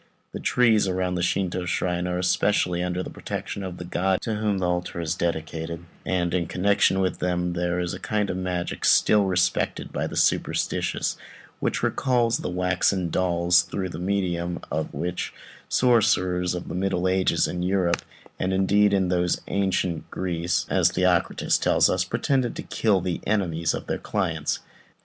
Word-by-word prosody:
The -, -, -6 dB
trees 115 Hz, -5 st, +3 dB
around 90 Hz, -1 st, -1 dB
a -, -, -1 dB
Shintô 90 Hz, 0 st, -1 dB
shrine 90 Hz, -1 st, -1 dB
are 90 Hz, 0 st, -2 dB
specially 90 Hz, -1 st, +2 dB
under 90 Hz, 0 st, -2 dB
the -, -, -7 dB
protection 100 Hz, -, -5 dB
of 95 Hz, -2 st, -6 dB
the 90 Hz, -, -7 dB
god 95 Hz, +1 st, 0 dB
to 110 Hz, -, -2 dB
whom 105 Hz, -1 st, 0 dB
the 90 Hz, -1 st, 0 dB
altar 90 Hz, 0 st, -2 dB
is 85 Hz, -1 st, -1 dB
dedicated; 85 Hz, -1 st, -3 dB, 0.2 s
and, 85 Hz, -2 st, 0 dB
in 90 Hz, -1 st, 0 dB
connection 95 Hz, +1 st, +2 dB
with 95 Hz, -1 st, -1 dB
them, 90 Hz, -1 st, -1 dB
there 90 Hz, 0 st, -1 dB
is 90 Hz, -1 st, -2 dB
a 95 Hz, -, -6 dB
kind 105 Hz, +2 st, -1 dB
of 90 Hz, -, -3 dB
magic 90 Hz, -1 st, -3 dB
still 105 Hz, -2 st, +5 dB
respected 90 Hz, -1 st, 0 dB
by -, -, -1 dB
the -, -, -7 dB
superstitious, -, -, 0 dB, 0.4 s
which -, -, -1 dB
recalls 120 Hz, -3 st, +2 dB
the -, -, -3 dB
waxen 90 Hz, 0 st, 0 dB
dolls, 90 Hz, 0 st, +3 dB
through 95 Hz, -2 st, -4 dB
the 85 Hz, -, -7 dB
medium 90 Hz, -2 st, -1 dB
of 80 Hz, +1 st, -2 dB
which 90 Hz, +1 st, -4 dB, 0.3 s
sorcerers 95 Hz, -7 st, +2 dB
of 90 Hz, -, -6 dB
the -, -, -5 dB
middle 95 Hz, 0 st, 0 dB
ages 95 Hz, 0 st, +2 dB
in 90 Hz, -, -3 dB
Europe, 90 Hz, -1 st, +1 dB, 0.4 s
and 95 Hz, +1 st, 0 dB
indeed 100 Hz, +2 st, +3 dB, 0.2 s
those 90 Hz, -1 st, +1 dB
of -, -, -19 dB
ancient 95 Hz, -4 st, -1 dB
Greece, 85 Hz, -2 st, -1 dB
as -, -, +3 dB
Theocritus -, -, +1 dB
tells -, -, +3 dB
us, 90 Hz, 0 st, +1 dB
pretended 120 Hz, +4 st, 0 dB
to -, -, -5 dB
kill 105 Hz, -5 st, +1 dB
the 90 Hz, -1 st, -3 dB
enemies 85 Hz, -6 st, 0 dB
of -, -, -6 dB
their -, -, -2 dB
clients. -, -, -2 dB
90 Hz, 170 wpm, -25 LUFS, 90-95 Hz, 0.4 s, still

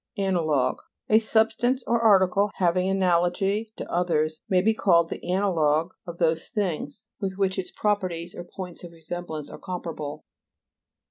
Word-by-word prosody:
AN'ALOGUE 160 Hz, -10 st, +1 dB, 0.3 s
A 220 Hz, -, +6 dB
substance 225 Hz, +3 st, +1 dB
or 235 Hz, 0 st, +1 dB
article 200 Hz, -2 st, +4 dB
having 180 Hz, +1 st, +2 dB
ana'logy 190 Hz, +3 st, +1 dB
to -, -, -6 dB
others 155 Hz, -3 st, 0 dB
may 185 Hz, -, +4 dB
be. 220 Hz, +4 st, +3 dB
called 170 Hz, -6 st, +3 dB
the -, -, -6 dB
an'alogue 175 Hz, -4 st, +1 dB, 0.2 s
of 170 Hz, 0 st, -7 dB
those 165 Hz, -1 st, +1 dB
things 175 Hz, -8 st, -3 dB
with 190 Hz, -1 st, -3 dB
which 195 Hz, -1 st, 0 dB
its 185 Hz, -, -4 dB
properties 185 Hz, -5 st, -1 dB
or 175 Hz, -, -7 dB
points 180 Hz, 0 st, -8 dB
of 170 Hz, -1 st, -10 dB
resemblance 160 Hz, -2 st, -6 dB
are -, -, -9 dB
comparable. 165 Hz, -5 st, -6 dB
180 Hz, 145 wpm, -25 LUFS, 165-200 Hz, 0.3 s, A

